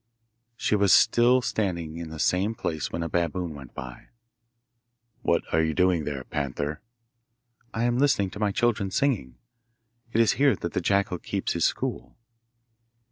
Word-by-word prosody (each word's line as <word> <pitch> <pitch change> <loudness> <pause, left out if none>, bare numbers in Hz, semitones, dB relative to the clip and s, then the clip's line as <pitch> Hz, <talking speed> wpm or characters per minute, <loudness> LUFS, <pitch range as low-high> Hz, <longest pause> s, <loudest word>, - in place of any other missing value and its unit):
She 105 - +1
was 100 -2 +3
still 120 +3 +5
standing 85 -9 -2
in 85 -1 -6
the 80 - -8
same 95 +7 +1
place 80 -7 -3
when 85 - -3
a - - -2
baboon 85 0 -1
went 70 -4 -12
by. 60 -1 -8 1.1
'What - - +1
are 80 - +4
you 80 -1 0
doing 90 -4 +2
there, 70 -3 -4
panther?' 70 +2 -3 0.9
'I 115 - 0
am 120 +1 +1
listening 115 -9 +2
to 105 - -8
my 105 -1 +1
children 110 -2 +1
singing. 95 - 0 0.7
It 115 - +1
is 115 -2 +5
here 140 -5 +5
that 85 - -5
the - - 0
jackal 100 -1 +1
keeps - - -2
his - - +1
school. - - -3
90 Hz, 160 wpm, -26 LUFS, 80-110 Hz, 1.1 s, still